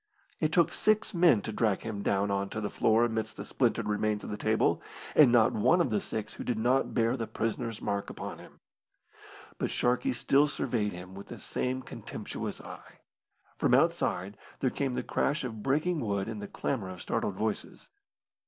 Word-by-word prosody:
It 155 Hz, -1 st, +1 dB
took 170 Hz, 0 st, +3 dB
six 215 Hz, 0 st, +2 dB
men 170 Hz, -, +5 dB
to -, -, -4 dB
drag 105 Hz, -2 st, +1 dB
him 105 Hz, -3 st, -4 dB
down 100 Hz, 0 st, +1 dB
on 100 Hz, 0 st, -1 dB
to 110 Hz, -, -4 dB
the 105 Hz, -1 st, -3 dB
floor 110 Hz, +2 st, +3 dB
amidst 110 Hz, -1 st, -3 dB
the -, -, -6 dB
splintered -, -, 0 dB
remains 105 Hz, 0 st, 0 dB
of -, -, -6 dB
the -, -, -2 dB
table 110 Hz, -6 st, +1 dB, 0.3 s
and 145 Hz, -6 st, +8 dB
not 120 Hz, 0 st, +5 dB
one 130 Hz, -, +4 dB
of 170 Hz, -, +2 dB
the 205 Hz, -, +1 dB
six 110 Hz, -, -4 dB
who -, -, -7 dB
did 120 Hz, -, -1 dB
not 125 Hz, +4 st, +1 dB
bear 115 Hz, 0 st, +2 dB
the 115 Hz, -4 st, -3 dB
prisoner's 115 Hz, 0 st, -3 dB
mark 100 Hz, 0 st, -1 dB
upon -, -, -6 dB
him. -, -, -15 dB, 1.0 s
But -, -, 0 dB
Sharkey 125 Hz, +1 st, +1 dB
still 140 Hz, +4 st, +3 dB
surveyed 110 Hz, -7 st, -1 dB
him 90 Hz, +1 st, -9 dB
with 100 Hz, +1 st, -9 dB
the -, -, -8 dB
same 130 Hz, +1 st, -2 dB
contemptuous -, -, -6 dB
eye. -, -, -12 dB, 0.6 s
From -, -, +4 dB
outside 95 Hz, +3 st, +1 dB, 0.2 s
there 130 Hz, -, +1 dB
came 135 Hz, -3 st, -1 dB
the -, -, -1 dB
crash 145 Hz, 0 st, 0 dB
of 110 Hz, -4 st, -5 dB
breaking 155 Hz, +7 st, +1 dB
wood 100 Hz, -5 st, -1 dB
and 110 Hz, -2 st, -5 dB
the 100 Hz, -, -5 dB
clamour 110 Hz, -5 st, -3 dB
of 90 Hz, -1 st, -8 dB
startled 100 Hz, -, -1 dB
voices. 110 Hz, +2 st, -4 dB
110 Hz, 190 wpm, -30 LUFS, 105-130 Hz, 1.0 s, and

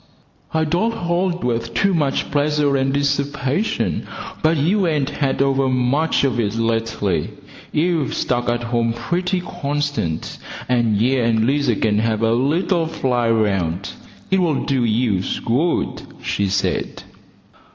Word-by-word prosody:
"I 160 Hz, 0 st, +1 dB
don't 180 Hz, +9 st, 0 dB
hold 175 Hz, -1 st, -1 dB
with 115 Hz, -1 st, -2 dB
too 195 Hz, -1 st, +2 dB
much 150 Hz, -5 st, 0 dB
pleasure 145 Hz, 0 st, +2 dB
and 135 Hz, 0 st, +1 dB
disherpation, 140 Hz, +5 st, -1 dB, 0.3 s
but 160 Hz, 0 st, +3 dB
you 180 Hz, +6 st, +2 dB
ain't 150 Hz, -4 st, 0 dB
had 135 Hz, -2 st, 0 dB
overmuch 135 Hz, +2 st, +1 dB
of 130 Hz, -3 st, +1 dB
it 105 Hz, -2 st, 0 dB
lately. 115 Hz, -7 st, 0 dB, 0.4 s
You've 160 Hz, -2 st, 0 dB
stuck 120 Hz, -1 st, 0 dB
at 120 Hz, 0 st, -1 dB
home 120 Hz, -1 st, 0 dB
pretty 180 Hz, +10 st, -1 dB
constant, 145 Hz, -, -3 dB, 0.3 s
and 120 Hz, -4 st, +2 dB
ye 125 Hz, +5 st, +2 dB
and 115 Hz, -2 st, +2 dB
Lizer 135 Hz, -2 st, +2 dB
can 105 Hz, 0 st, +1 dB
have 110 Hz, 0 st, 0 dB
a 115 Hz, 0 st, +3 dB
little 160 Hz, -, +1 dB
fly 125 Hz, -7 st, 0 dB
round. 100 Hz, -5 st, 0 dB, 0.4 s
It'll 175 Hz, -6 st, +2 dB
do 135 Hz, -3 st, +1 dB
yous 110 Hz, -4 st, 0 dB
good," 140 Hz, +9 st, 0 dB, 0.2 s
she 100 Hz, -, 0 dB
said. 95 Hz, -, -1 dB
135 Hz, 130 wpm, -20 LUFS, 115-155 Hz, 0.4 s, but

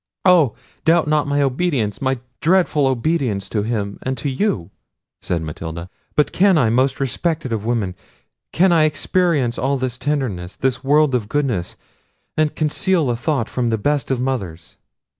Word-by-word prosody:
"Oh! 170 Hz, -, +5 dB, 0.3 s
doubt 165 Hz, -1 st, +3 dB
not 150 Hz, -1 st, +2 dB
my 145 Hz, 0 st, +2 dB
obedience, 130 Hz, -, 0 dB
my 130 Hz, -1 st, +1 dB, 0.2 s
dreadful 165 Hz, -4 st, +3 dB
obedience 130 Hz, -6 st, 0 dB
to 105 Hz, -, -1 dB
him 105 Hz, -2 st, -3 dB
and 130 Hz, 0 st, -3 dB
to 140 Hz, -, -2 dB
you!" 130 Hz, -, -1 dB, 0.5 s
said 85 Hz, -2 st, -2 dB
Matilda. 80 Hz, +3 st, -6 dB, 0.2 s
"But 150 Hz, -, +2 dB
can 190 Hz, -1 st, +4 dB
I, 115 Hz, -7 st, +3 dB
most 130 Hz, +3 st, +1 dB
respected 140 Hz, 0 st, -1 dB
of 110 Hz, -1 st, -3 dB
women, 110 Hz, -6 st, 0 dB, 0.6 s
can 185 Hz, +2 st, +3 dB
I 160 Hz, -2 st, +5 dB
experience 155 Hz, -5 st, +1 dB
all 135 Hz, +2 st, +1 dB
this 130 Hz, -1 st, -3 dB
tenderness, 125 Hz, -11 st, -2 dB
this 130 Hz, 0 st, -1 dB
world 145 Hz, 0 st, +3 dB
of 110 Hz, -4 st, -1 dB
goodness, 125 Hz, -12 st, -1 dB, 0.6 s
and 155 Hz, -1 st, +1 dB
conceal 155 Hz, -1 st, +1 dB
a -, -, 0 dB
thought 125 Hz, -1 st, -1 dB
from 120 Hz, -2 st, -1 dB
the 110 Hz, -, +1 dB
best 145 Hz, +6 st, 0 dB
of 130 Hz, -2 st, 0 dB
mothers?" 100 Hz, -11 st, -4 dB
130 Hz, 160 wpm, -20 LUFS, 115-150 Hz, 0.6 s, Oh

